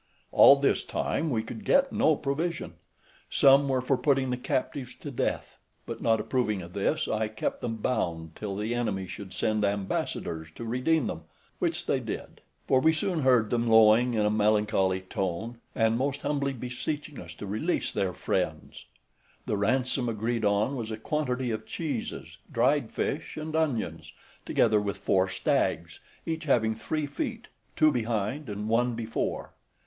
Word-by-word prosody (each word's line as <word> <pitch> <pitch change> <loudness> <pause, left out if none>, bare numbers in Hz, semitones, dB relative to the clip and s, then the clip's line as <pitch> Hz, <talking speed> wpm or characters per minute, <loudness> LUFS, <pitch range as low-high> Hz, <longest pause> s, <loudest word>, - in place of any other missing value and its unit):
All - - +9
this - - +1
time 160 - -1
we 115 -5 0
could 210 - -8
get 275 +5 +3
no 155 - +4
provision. 155 +5 -2 0.6
Some 140 0 +5
were 130 -1 +1
for 130 +1 +1
putting 135 -3 +2
the - - +1
captives 130 +1 -3
to 145 - -8
death, 125 - -2 0.3
but - - -6
not 115 -1 +3
approving 110 -4 -1
of 85 +1 -11
this, 150 +10 0
I 110 0 0
kept 110 - -3
them 115 -2 -2
bound 85 -8 -2
till 100 -2 -4
the 105 +4 -2
enemy 105 -6 -1
should 95 0 -8
send 110 +1 0
ambassadors 95 -5 -2
to 115 - -6
redeem 130 +5 +1
them, 80 -1 -5 0.3
which - - -1
they - - +1
did; - - -6 0.3
for 130 - +4
we 160 +4 +4
soon 175 +1 -1
heard 125 -5 +3
them 120 0 +1
lowing 110 +2 +6
in 105 -1 +2
a 105 - +2
melancholy 105 -3 +2
tone, 95 +5 -3 0.2
and 115 0 +2
most 140 +1 -1
humbly 140 -1 0
beseeching 135 +4 -5
us 85 -1 -10
to 100 - -7
release 110 - -1
their 95 -2 0
friends. - - -3 0.6
The - - -1
ransom 125 +4 +1
agreed 115 +1 -1
on 105 +6 +2
was 115 -4 -4
a 110 - -4
quantity 125 -1 -1
of 110 - -4
cheeses, 145 -9 -4
dried - - +2
fish, - - -3
and 155 0 -4
onions, 150 -8 -1 0.3
together 110 -2 +3
with 100 -1 -3
four 95 0 +2
stags, - - 0 0.3
each 160 0 -3
having 110 -6 +3
three 150 +7 -2
feet, 145 0 -4 0.3
two 155 - +5
behind 115 +3 -2
and 105 +1 -4
one 120 +2 +2
before. 115 -1 -3
115 Hz, 165 wpm, -28 LUFS, 105-140 Hz, 0.6 s, All